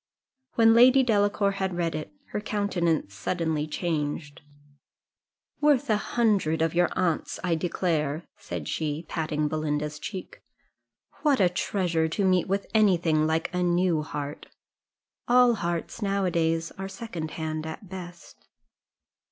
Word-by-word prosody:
When 225 -1 +6
Lady 255 +3 +7
Delacour 205 -3 +2
had 190 -2 -2
read 170 -2 0
it, 155 0 -5 0.2
her 210 - -2
countenance 175 - -1
suddenly 155 - -1
changed 150 -2 -3 1.2
"Worth 290 -4 +3
a - - +5
hundred 200 -9 +1
of 165 - 0
your 175 0 +3
aunt's, 170 -4 0
I 180 -2 +1
declare," 160 -2 -1
said - - -6
she, 155 +1 -2
patting 155 -2 -1
Belinda's 150 -1 -2
cheek. 190 +2 -7 0.8
"What 290 -5 +3
a 185 -3 +5
treasure 175 -3 0
to 195 +5 -1
meet 185 -2 +3
with 195 +1 -1
any 210 -5 +5
thing 155 -2 +1
like 160 +2 -1
a 180 - 0
new 175 -2 +2
heart! 145 -1 -6 0.8
all 245 -1 +6
hearts, 170 -1 -3
now 200 -1 0
a 180 - +1
days, 165 -1 0
are 195 0 -4
second 180 -8 -6
hand, 155 -1 -3
at 160 +5 -8
best." 175 -2 -10
175 Hz, 140 wpm, -27 LUFS, 155-200 Hz, 1.2 s, Lady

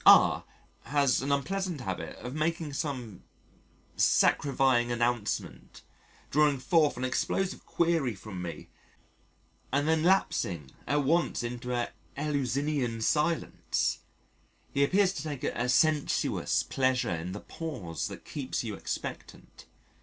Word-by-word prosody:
R - - +7 0.4
has 140 -3 +2
an 140 +2 -1
unpleasant 180 +2 -1
habit 90 -7 -4
of 125 - -7
making 155 0 -1
some 125 - -4 0.7
scarifying 130 -3 +3
announcement 120 -2 -2 0.5
drawing 150 -1 +4
forth 150 +4 +2
an 125 - -3
explosive 185 +8 -1
query 165 -9 +1
from 95 -2 -7
me 85 -2 -6 1.0
and 145 +3 +1
then 160 0 +3
lapsing 95 - +1 0.2
at 145 0 +2
once 165 -1 +1
into 120 +1 -4
an 120 -1 -1 0.3
eleusinian 140 -4 -1
silence: 155 +6 0 0.7
he 140 - +3
appears 190 +5 +3
to 160 - -4
take 145 -3 -5
a 125 +1 -1
sensuous 150 +3 +2
pleasure 130 -5 +1
in 85 +2 -4
the 105 - -5
pause 110 - -5
that - - -9
keeps 135 -4 -3
you 110 -3 -4
expectant. - - -7
135 Hz, 120 wpm, -29 LUFS, 120-155 Hz, 1.0 s, R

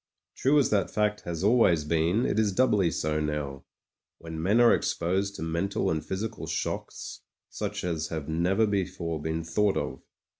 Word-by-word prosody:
True 140 +3 +3
as 140 - +3
that 100 -3 +2
fact 105 0 0
has 85 0 -4
always 100 -8 +4
been, 85 +9 +1
it 110 - +1
is 105 -2 +2
doubly 105 -5 +3
so 75 -1 -1
now, 75 -3 -3 0.5
when 80 -1 -7
men 100 +7 +3
are 120 -1 +7
exposed 95 +4 0
to 80 - -5
mental 85 +4 -1
and 80 -1 -1
physical 110 +4 -4
shocks - - -4 0.3
such - - -4
as 80 -3 -2
have 80 -3 -5
never 90 +7 +2
before 90 -6 -2
been 80 +1 -2
thought 100 +5 +1
of. - - -3
90 Hz, 165 wpm, -28 LUFS, 80-105 Hz, 0.5 s, are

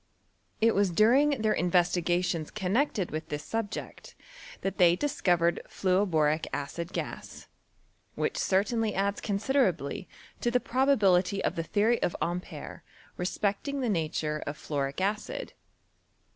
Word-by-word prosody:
It 225 0 +5
was 200 -1 +3
during 245 - +4
their 215 - +3
investigations 175 -1 +1
connected 210 - 0
with 155 +1 -5
this 150 0 -4
sub 225 -2 -2
ject, - - -8 0.5
that 195 0 -3
they 175 -1 +6
di&co\ 185 -7 +1
ered 170 +1 +1
Jluoboric 165 -5 +1
acid 165 +5 -4
gas, - - -6 0.7
which - - -1
certainly 215 +3 +1
adds 200 +1 0
considerably 200 - 0 0.3
to 240 - +1
the 250 +1 +2
probability 205 -8 +2
of - - 0
the 165 - -1
theory 215 +7 +1
of - - 0
Ampere 175 +1 -4 0.3
respecting 205 +9 -2
the 245 - 0
nature 155 -4 -1
of 145 +1 -4
fluoric 140 -1 -3
acid. 210 - -2
190 Hz, 130 wpm, -29 LUFS, 170-220 Hz, 0.7 s, they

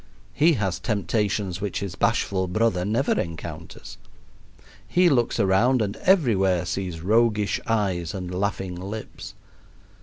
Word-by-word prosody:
He 160 +8 +4
has 100 - -1
temptations 100 -3 -1
which 100 -2 -2
his 100 -3 -5
bashful 95 -1 0
brother 95 -1 +1
never 110 +8 0
encounters. 85 -2 -8 0.9
He 180 0 +4
looks 120 -5 +1
around 110 +6 +3
and 105 -2 -1
everywhere 95 - +2
sees 90 -2 -4
roguish 105 +1 +2
eyes 95 -7 -1
and 90 -1 -5
laughing 95 -1 -2
lips. 100 +5 -8
100 Hz, 120 wpm, -24 LUFS, 90-115 Hz, 0.9 s, He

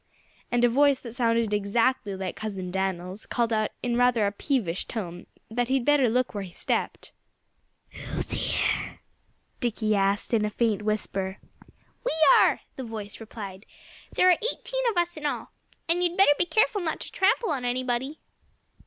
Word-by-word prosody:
And 240 0 +2
a - - +7
voice 275 +2 +4
that 235 -3 -8
sounded 230 -3 +1
exactly 210 +1 +1
like 190 -1 -4
Cousin 195 -4 -5
Dan'l's 190 +1 -3
called 235 -2 0
out 215 -1 +1
in 240 -1 0
rather 245 -3 +3
a 200 - +1
peevish 205 - -1
tone 175 -6 -6 0.2
that 240 +1 0
he'd 260 -1 +1
better 290 -4 +4
look 250 +2 +1
out - - -16
where 205 -2 -3
he 185 - -9
stepped. - - -3 0.8
"Who's - - -5
here?" - - -1 0.6
Dickie 215 -3 0
asked 200 +3 0
in 220 -2 +3
a 210 - +1
faint 215 -1 0
whisper. 200 -2 -2 0.7
"We - - 0 0.3
are!" - - +3 0.2
the 265 - -4
voice 215 -3 -7
replied. 205 -3 -9 0.4
"There 365 - +5
are 350 - +3
eighteen - - -4
of 425 - -3
us 345 -1 0
in 300 -1 -2
all. - - -4 0.4
And 345 +2 +2
you'd 350 0 0
better 385 -7 +7
be 350 - +1
careful 410 +3 +2
not 320 -3 -2
to - - -6
trample 390 +1 +2
on 270 -4 -2
anybody." 255 +3 -1
235 Hz, 170 wpm, -26 LUFS, 205-275 Hz, 0.8 s, a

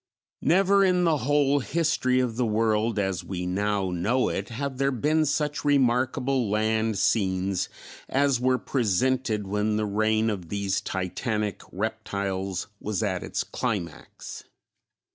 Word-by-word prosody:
_ - - -66 0.4
Never 195 +3 +5
in 180 -2 +3
the 165 -3 +3
whole 145 +1 +2
history 140 -4 +1
of 125 -3 0
the 125 +1 +1
world 110 0 +1
as 95 -3 -1
we 90 -2 -4
now 100 +1 0
know 105 +9 +1
it - - -3
have 135 +2 -4
there 135 0 +3
been 150 +5 +1
such 150 0 -1
remarkable 130 -2 +2
land 110 0 +1
scenes 95 -2 +1 0.4
as 140 -2 +2
were 130 +1 +2
presented 120 -2 0
when 105 +2 0
the 110 - 0
reign 110 +2 +1
of 90 -5 -6
these 100 -1 -1
titanic 105 +3 -2
reptiles 100 -2 -3
was 105 -3 -2
at - - -1
its - - -2
climax. 100 -11 -5
110 Hz, 140 wpm, -26 LUFS, 100-130 Hz, 0.4 s, Never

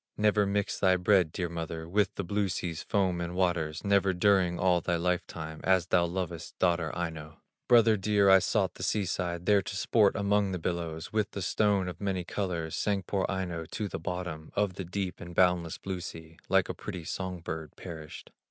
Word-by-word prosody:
Never 105 -1 +3
mix 100 0 -1
thy 95 -1 +4
bread, 90 -2 +3
dear 90 +1 -2
mother, 80 -1 -5
With 100 +2 +1
the 100 - -3
blue 100 +2 0
sea's 85 -2 -3
foam 95 -4 0
and 85 +1 -4
waters, 85 -4 0
Never 100 -2 +3
during 90 -2 +3
all 90 -2 +3
thy 85 - 0
life 90 +1 0
time, 80 -1 -7
As 95 -2 +3
thou 90 -1 +3
lovest 85 -1 -5
daughter 85 -3 +1
Aino. 80 -3 -5 0.3
"Brother 115 -2 +6
dear, 100 0 +2
I 95 0 +8
sought 95 0 0
the - - -11
sea 100 +2 0
side, 85 -1 -3
There 105 -1 +5
to 95 +1 -6
sport 100 +1 +3
among 100 -1 +1
the - - -1
billows; 85 -1 -4
With 105 -2 +1
the 100 - -4
stone 100 -1 +2
of 90 0 -7
many 95 -3 -1
colors 85 -3 -3
Sank 100 -3 0
poor 95 0 0
Aino 90 -4 -3
to 105 +6 -4
the - - -5
bottom 85 -2 -5
Of 100 -2 +1
the 95 - -6
deep 90 +1 -4
and 85 0 -9
boundless 90 -2 +2
blue 95 -2 -4
sea, 80 -2 -9
Like - - +4
a - - -3
pretty 90 -3 -7
song 90 +1 -4
bird 80 -2 -6
perished. 80 -4 -9
90 Hz, 200 wpm, -29 LUFS, 85-100 Hz, 0.3 s, I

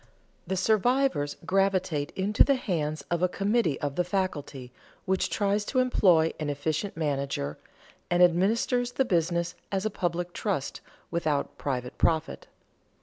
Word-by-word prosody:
The 190 - -1
survivors 215 - +1
gravitate 185 -5 +1
into 200 +2 +3
the 275 - +3
hands 155 - -2
of 170 0 0
a 180 - +3
committee 200 - 0
of 145 -1 -2
the 180 - +3
faculty, 155 -9 -3 0.3
which 190 0 0
tries 205 0 0
to 260 - -3
employ 185 -10 +4
an 150 -1 -2
efficient 155 +6 -2
manager, 140 - -2 0.5
and 175 +1 +4
administers 225 +8 +2
the 265 - +1
business 170 -3 0 0.2
as 195 +1 -1
a 215 - 0
public 175 -1 -2
trust 190 -11 -3 0.3
without 155 -4 -1
private 125 -3 -3
profit. 160 -1 0
175 Hz, 140 wpm, -27 LUFS, 150-200 Hz, 0.5 s, employ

